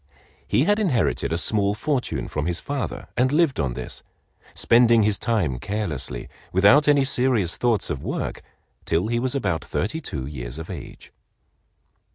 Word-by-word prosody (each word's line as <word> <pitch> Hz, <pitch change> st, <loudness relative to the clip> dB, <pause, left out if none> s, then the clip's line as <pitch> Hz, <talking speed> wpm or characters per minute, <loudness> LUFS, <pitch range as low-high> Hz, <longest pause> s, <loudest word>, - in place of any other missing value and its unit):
He 130 Hz, -, +3 dB
had 205 Hz, +5 st, +2 dB
inherited 140 Hz, -, +1 dB
a 85 Hz, -, +1 dB
small 100 Hz, +3 st, +1 dB
fortune 135 Hz, +2 st, -2 dB
from 75 Hz, +1 st, -3 dB
his 85 Hz, -1 st, -1 dB
father 140 Hz, -2 st, -4 dB
and 130 Hz, +1 st, +2 dB
lived 155 Hz, -2 st, +2 dB
on 65 Hz, -4 st, -1 dB
this, -, -, -5 dB, 0.5 s
spending 115 Hz, -1 st, +5 dB
his 105 Hz, -1 st, +1 dB
time 95 Hz, -, 0 dB
carelessly, 75 Hz, -, -3 dB, 0.2 s
without 105 Hz, +12 st, +5 dB
any 145 Hz, -2 st, +5 dB
serious 125 Hz, -9 st, +1 dB
thoughts 115 Hz, -7 st, +1 dB
of 70 Hz, -5 st, -3 dB
work, -, -, -4 dB, 0.4 s
till 90 Hz, +7 st, 0 dB
he 120 Hz, 0 st, +1 dB
was 130 Hz, +2 st, 0 dB
about 90 Hz, -, -1 dB
thirty 135 Hz, -, -2 dB
two 70 Hz, -, -5 dB
years 65 Hz, -2 st, -6 dB
of 80 Hz, -, -7 dB
age. -, -, -10 dB
110 Hz, 160 wpm, -23 LUFS, 80-130 Hz, 0.5 s, spending